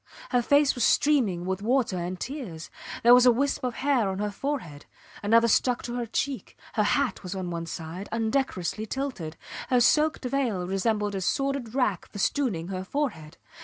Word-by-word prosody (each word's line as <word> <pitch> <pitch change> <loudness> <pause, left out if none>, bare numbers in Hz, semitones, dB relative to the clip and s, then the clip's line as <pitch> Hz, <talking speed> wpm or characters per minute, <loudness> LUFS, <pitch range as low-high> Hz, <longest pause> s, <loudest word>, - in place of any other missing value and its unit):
Her 245 -2 +3
face 285 +3 +4
was 245 - -2
streaming 225 -15 +3
with 190 +1 -2
water 240 -2 +1
and 180 +1 -4
tears; 235 - -6 0.3
there 240 +1 +8
was 250 0 +7
a - - +8
wisp 275 +4 0
of 250 -2 -2
hair 260 -7 +1
on 190 - -3
her 210 +1 -2
forehead, 200 - -4 0.3
another 230 +3 +4
stuck 245 +2 +2
to 240 - -5
her 240 -1 -3
cheek; 270 +3 -3 0.2
her 215 - +1
hat 260 +5 +1
was 180 -1 -6
on 185 -2 -4
one 170 -1 -4
side, 165 +4 -6
undecorously 220 -3 -1
tilted; 215 - -4 0.3
her 250 - +4
soaked 300 +3 +3
veil 245 -9 0
resembled 205 +2 0
a 195 - -3
sordid 275 +2 -1
rag 230 -9 0
festooning 205 - -1
her 185 -1 -3
forehead. 190 - -3
225 Hz, 175 wpm, -27 LUFS, 185-265 Hz, 0.3 s, there